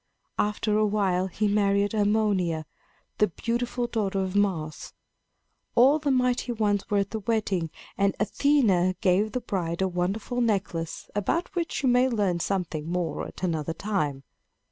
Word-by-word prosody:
After 210 Hz, 0 st, +1 dB
a 215 Hz, -, +4 dB
while 190 Hz, -3 st, +1 dB
he 210 Hz, +3 st, -1 dB
married 200 Hz, 0 st, +2 dB
Harmonia, 205 Hz, -6 st, +1 dB, 0.5 s
the 210 Hz, -, +5 dB
beautiful 240 Hz, +5 st, -2 dB
daughter 205 Hz, -5 st, -1 dB
of 190 Hz, 0 st, -2 dB
Mars. 175 Hz, -7 st, -1 dB, 0.8 s
All 270 Hz, +6 st, +6 dB
the 295 Hz, -1 st, -1 dB
Mighty 250 Hz, -1 st, +1 dB
Ones 205 Hz, -3 st, 0 dB
were 205 Hz, -, +2 dB
at 200 Hz, -1 st, 0 dB
the 220 Hz, -, -2 dB
wedding; 200 Hz, -6 st, -1 dB, 0.3 s
and 200 Hz, 0 st, +2 dB
Athena 210 Hz, -6 st, +2 dB
gave 205 Hz, +2 st, +2 dB
the 250 Hz, -, -1 dB
bride 175 Hz, -3 st, -2 dB
a -, -, +2 dB
wonderful 195 Hz, +7 st, -2 dB
necklace 195 Hz, -7 st, -1 dB
about 330 Hz, -, -1 dB
which 335 Hz, -5 st, -2 dB
you 260 Hz, -, +4 dB
may 250 Hz, +1 st, +4 dB
learn 200 Hz, -7 st, 0 dB
something 170 Hz, -4 st, -2 dB
more 170 Hz, -4 st, -2 dB
at -, -, -12 dB
another 165 Hz, -3 st, -1 dB
time. 155 Hz, -8 st, -2 dB
205 Hz, 150 wpm, -26 LUFS, 180-225 Hz, 0.8 s, All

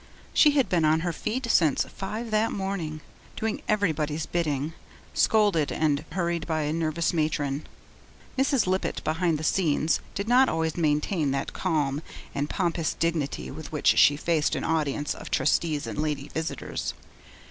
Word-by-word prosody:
She 300 Hz, -2 st, +6 dB
had 275 Hz, -3 st, +3 dB
been 175 Hz, -3 st, +1 dB
on 155 Hz, +1 st, +3 dB
her 175 Hz, 0 st, -1 dB
feet 235 Hz, -, -3 dB
since 155 Hz, -5 st, +4 dB
five 220 Hz, +4 st, -6 dB
that 215 Hz, +1 st, +2 dB
morning, 185 Hz, -6 st, -3 dB, 0.3 s
doing 220 Hz, -1 st, -2 dB
everybody's 160 Hz, -7 st, 0 dB
bidding, 155 Hz, -3 st, -1 dB, 0.4 s
scolded 205 Hz, -9 st, +3 dB
and 150 Hz, -2 st, +1 dB
hurried 170 Hz, -3 st, -1 dB
by 160 Hz, -2 st, 0 dB
a 150 Hz, +1 st, -1 dB
nervous 165 Hz, +1 st, 0 dB
matron. 150 Hz, -3 st, -1 dB, 0.7 s
Mrs. 265 Hz, -1 st, +2 dB
Lippett, 185 Hz, +1 st, -1 dB
behind 165 Hz, +1 st, +1 dB
the 155 Hz, -, -6 dB
scenes, 160 Hz, -2 st, +2 dB, 0.2 s
did 200 Hz, +2 st, -3 dB
not 255 Hz, +3 st, +5 dB
always 160 Hz, -1 st, -1 dB
maintain 155 Hz, 0 st, +1 dB
that 135 Hz, -, -3 dB
calm 150 Hz, -5 st, 0 dB, 0.3 s
and 145 Hz, +1 st, -2 dB
pompous 165 Hz, -2 st, -1 dB
dignity 145 Hz, -, -1 dB
with -, -, -8 dB
which -, -, +3 dB
she 145 Hz, -, +6 dB
faced 160 Hz, -1 st, +1 dB
an -, -, -3 dB
audience 150 Hz, -2 st, 0 dB
of -, -, -9 dB
Trustees 150 Hz, +2 st, +1 dB
and -, -, -5 dB
lady 150 Hz, -2 st, -2 dB
visitors. 160 Hz, 0 st, -4 dB
160 Hz, 155 wpm, -26 LUFS, 150-185 Hz, 0.7 s, She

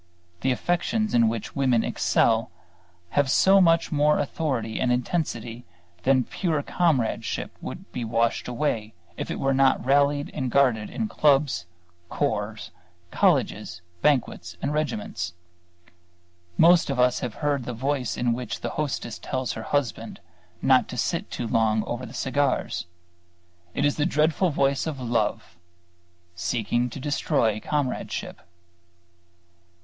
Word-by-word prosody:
The 135 Hz, -, 0 dB
affections 175 Hz, -, 0 dB
in 115 Hz, -1 st, +5 dB
which 115 Hz, -2 st, -5 dB
women 130 Hz, -4 st, +2 dB
excel 115 Hz, -2 st, +2 dB, 0.6 s
have 145 Hz, +5 st, +1 dB
so 195 Hz, +7 st, +5 dB
much 165 Hz, -2 st, +3 dB
more 150 Hz, 0 st, +3 dB
authority 135 Hz, -6 st, -2 dB
and 125 Hz, -, +1 dB
intensity 120 Hz, -3 st, -2 dB, 0.4 s
that 130 Hz, +1 st, +2 dB
pure 160 Hz, -6 st, -1 dB
comradeship 150 Hz, -11 st, 0 dB
would -, -, -8 dB
be 125 Hz, -, -4 dB
washed 115 Hz, +1 st, 0 dB
away 115 Hz, -4 st, -2 dB, 0.2 s
if -, -, -5 dB
it -, -, -3 dB
were 135 Hz, 0 st, +1 dB
not 135 Hz, -1 st, +3 dB
rallied 140 Hz, +1 st, +2 dB
and 130 Hz, -4 st, -2 dB
guarded 120 Hz, -5 st, +2 dB
in 225 Hz, -, -2 dB
clubs, 140 Hz, -, +2 dB, 0.4 s
corps, -, -, -2 dB, 0.4 s
colleges, 85 Hz, 0 st, +1 dB, 0.2 s
banquets 145 Hz, -5 st, 0 dB
and 140 Hz, -, -2 dB
regiments. 110 Hz, -, -2 dB, 1.2 s
Most 170 Hz, -1 st, +6 dB
of 135 Hz, -2 st, -1 dB
us 125 Hz, 0 st, +3 dB
have 120 Hz, -3 st, -4 dB
heard 145 Hz, -4 st, -1 dB
the 125 Hz, -, -3 dB
voice 130 Hz, +1 st, -2 dB
in 120 Hz, -1 st, +1 dB
which 120 Hz, -1 st, -5 dB
the -, -, -3 dB
hostess 120 Hz, -6 st, -3 dB
tells 130 Hz, -1 st, -3 dB
her 110 Hz, -, -6 dB
husband 120 Hz, -5 st, -2 dB, 0.4 s
not -, -, +4 dB
to -, -, -7 dB
sit -, -, -1 dB
too 120 Hz, -, -4 dB
long 110 Hz, -2 st, +2 dB
over 120 Hz, +1 st, -5 dB
the 120 Hz, -, -11 dB
cigars. 135 Hz, -8 st, -1 dB, 0.9 s
It -, -, +1 dB
is 145 Hz, -, +1 dB
the 150 Hz, +1 st, +2 dB
dreadful 160 Hz, +3 st, +2 dB
voice 140 Hz, 0 st, +1 dB
of 150 Hz, -4 st, -4 dB
Love, 115 Hz, -7 st, -1 dB, 0.8 s
seeking 115 Hz, +7 st, -1 dB
to 120 Hz, -, -8 dB
destroy 135 Hz, -, 0 dB
Comradeship. 145 Hz, +1 st, -3 dB
130 Hz, 135 wpm, -25 LUFS, 115-145 Hz, 1.2 s, Most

